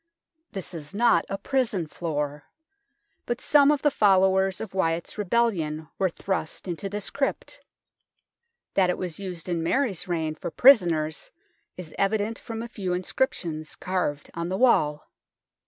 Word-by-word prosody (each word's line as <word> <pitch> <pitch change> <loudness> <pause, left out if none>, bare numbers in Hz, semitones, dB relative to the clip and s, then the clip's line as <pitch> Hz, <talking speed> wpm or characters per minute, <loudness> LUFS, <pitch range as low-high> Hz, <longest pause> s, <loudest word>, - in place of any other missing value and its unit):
This 190 -3 -6
is 155 +2 -8
not 225 -7 +4
a 195 - -2
prison 235 -8 0
floor, 150 -2 -4 0.8
but 240 - -1
some 285 -1 +5
of 295 -2 +2
the 295 - +4
followers 190 -4 +3
of 220 -5 -6
Wyatt's 165 -3 -1
rebellion 180 -8 0
were 190 - +3
thrust 180 -1 -4
into 180 +3 -4
this 205 +1 -5
crypt. 275 -1 -2 1.1
That 185 -2 +3
it 180 - 0
was 180 -2 -4
used 185 -3 -6
in 170 -2 -1
Mary's 200 - 0
reign 160 -3 -1
for 155 - -6
prisoners 170 - +4 0.5
is 175 -4 -8
evident 210 +2 0
from 225 0 -6
a - - -5
few 195 -6 -3
inscriptions 175 -5 -2
carved 180 -6 -2
on 170 +1 -3
the 190 - -1
wall. 150 -12 +3
185 Hz, 145 wpm, -26 LUFS, 165-220 Hz, 1.1 s, some